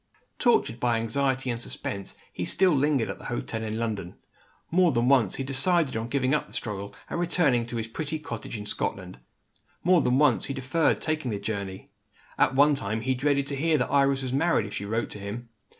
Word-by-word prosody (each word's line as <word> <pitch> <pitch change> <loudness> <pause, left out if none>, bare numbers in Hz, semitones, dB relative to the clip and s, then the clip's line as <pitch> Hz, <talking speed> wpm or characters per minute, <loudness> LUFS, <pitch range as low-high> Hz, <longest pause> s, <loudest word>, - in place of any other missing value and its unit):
Tortured 235 - +2
by 120 -1 +2
anxiety 130 +3 0
and 115 0 -4
suspense, 100 -4 -4 0.2
he - - -3
still 190 -1 +3
lingered 140 -3 +2
at - - -9
the - - -12
hotel 115 -2 -3
in 110 0 -3
London. 105 -6 -3 0.6
More 175 0 +4
than 120 -2 +1
once, 125 -8 +4
he 135 - -3
decided 140 +3 +2
on 115 +1 -2
giving 130 +1 +1
up 150 - 0
the - - -16
struggle, 100 -4 -4
and - - -3
returning 150 -9 +2
to 120 - -6
his 115 -1 -2
pretty 155 +6 -3
cottage 115 -6 -6
in 105 - -7
Scotland. 90 -6 -3 0.6
More 180 -1 +5
than 125 -1 +2
once, 145 -4 +3
he 140 - -4
deferred 135 +5 +1
taking 155 -4 -1
the 105 - -2
journey. 100 -2 -5 0.5
At 135 - +3
one 145 +2 +6
time, 110 -4 -2
he 130 +3 +1
dreaded 140 +2 +1
to 140 - -2
hear 155 +3 +2
that 125 - -1
Iris 140 -1 +3
was 130 -1 -3
married, 160 -5 +2
if 100 - -8
she 100 - -4
wrote 110 +3 -2
to 105 - -6
him. 110 +4 -6
130 Hz, 210 wpm, -27 LUFS, 110-145 Hz, 0.6 s, one